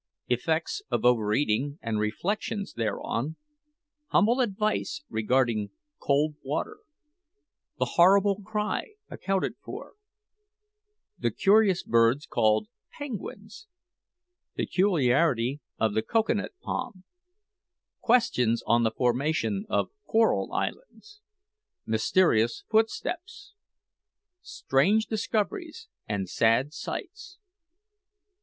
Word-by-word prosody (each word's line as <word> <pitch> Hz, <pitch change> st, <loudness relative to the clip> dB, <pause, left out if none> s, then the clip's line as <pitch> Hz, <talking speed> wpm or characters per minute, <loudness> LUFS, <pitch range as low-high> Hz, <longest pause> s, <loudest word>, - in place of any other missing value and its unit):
EFFECTS 160 Hz, -, 0 dB
OF -, -, -1 dB
OVEREATING, 125 Hz, +4 st, +2 dB
AND 110 Hz, -2 st, -2 dB
REFLECTIONS 195 Hz, -, -2 dB
THEREON 120 Hz, +5 st, -2 dB, 0.7 s
HUMBLE 235 Hz, +2 st, +3 dB
ADVICE 215 Hz, +6 st, -1 dB
REGARDING 110 Hz, -2 st, +1 dB, 0.3 s
COLD 145 Hz, +2 st, +1 dB
WATER 140 Hz, +3 st, -3 dB, 1.0 s
THE -, -, +1 dB
"HORRIBLE 195 Hz, +3 st, +4 dB
CRY" 210 Hz, -, -3 dB, 0.2 s
ACCOUNTED 195 Hz, 0 st, -2 dB
FOR -, -, -8 dB, 1.3 s
THE -, -, +1 dB
CURIOUS 200 Hz, -2 st, +3 dB
BIRDS 115 Hz, +5 st, +3 dB
CALLED 110 Hz, -, +2 dB, 0.3 s
PENGUINS 225 Hz, -, -7 dB, 0.9 s
PECULIARITY 145 Hz, -, +1 dB, 0.2 s
OF 110 Hz, -2 st, +1 dB
THE 110 Hz, -, +1 dB
COCOA 225 Hz, -, +1 dB
NUT 205 Hz, -, -3 dB
PALM 185 Hz, -5 st, -4 dB, 1.0 s
QUESTIONS 125 Hz, -, +2 dB
ON 120 Hz, 0 st, +3 dB
THE 115 Hz, -, +3 dB
FORMATION 145 Hz, -, 0 dB
OF -, -, 0 dB, 0.2 s
CORAL 225 Hz, 0 st, +2 dB
ISLANDS 420 Hz, -4 st, -5 dB, 0.6 s
MYSTERIOUS 115 Hz, 0 st, +2 dB
FOOTSTEPS 360 Hz, -, -1 dB, 0.9 s
STRANGE 195 Hz, +12 st, +1 dB
DISCOVERIES 310 Hz, -, -3 dB, 0.2 s
AND 100 Hz, -3 st, -2 dB
SAD 115 Hz, -, +2 dB
SIGHTS. 375 Hz, -, -7 dB
170 Hz, 85 wpm, -27 LUFS, -, 1.3 s, HORRIBLE